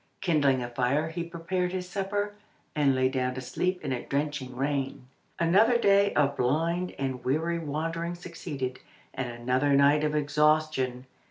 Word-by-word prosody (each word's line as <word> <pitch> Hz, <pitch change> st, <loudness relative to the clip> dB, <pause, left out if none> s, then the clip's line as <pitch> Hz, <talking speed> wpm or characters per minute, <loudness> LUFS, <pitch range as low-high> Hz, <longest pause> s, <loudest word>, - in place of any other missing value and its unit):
Kindling 145 Hz, -8 st, +2 dB
a -, -, -3 dB
fire 130 Hz, +6 st, 0 dB
he 170 Hz, +1 st, -4 dB
prepared 175 Hz, +2 st, -2 dB
his 180 Hz, -1 st, -4 dB
supper, 205 Hz, +2 st, -2 dB, 0.4 s
and 140 Hz, -3 st, +3 dB
lay 130 Hz, 0 st, +3 dB
down 130 Hz, -1 st, -1 dB
to 130 Hz, -, -4 dB
sleep 180 Hz, +8 st, -1 dB
in 135 Hz, -, -2 dB
a 125 Hz, -2 st, -1 dB
drenching 140 Hz, -3 st, -3 dB
rain. 135 Hz, -1 st, -2 dB, 0.3 s
Another 205 Hz, +8 st, +4 dB
day 200 Hz, -2 st, +4 dB
of 140 Hz, -1 st, +2 dB
blind 165 Hz, +8 st, 0 dB
and 130 Hz, -2 st, -3 dB
weary 160 Hz, +5 st, 0 dB
wandering 165 Hz, +3 st, -3 dB
succeeded, 155 Hz, -7 st, -5 dB, 0.3 s
and 130 Hz, -2 st, -3 dB
another 125 Hz, +4 st, 0 dB
night 140 Hz, +2 st, +5 dB
of 150 Hz, 0 st, 0 dB
exhaustion. 150 Hz, -3 st, +1 dB
150 Hz, 155 wpm, -28 LUFS, 130-170 Hz, 0.4 s, night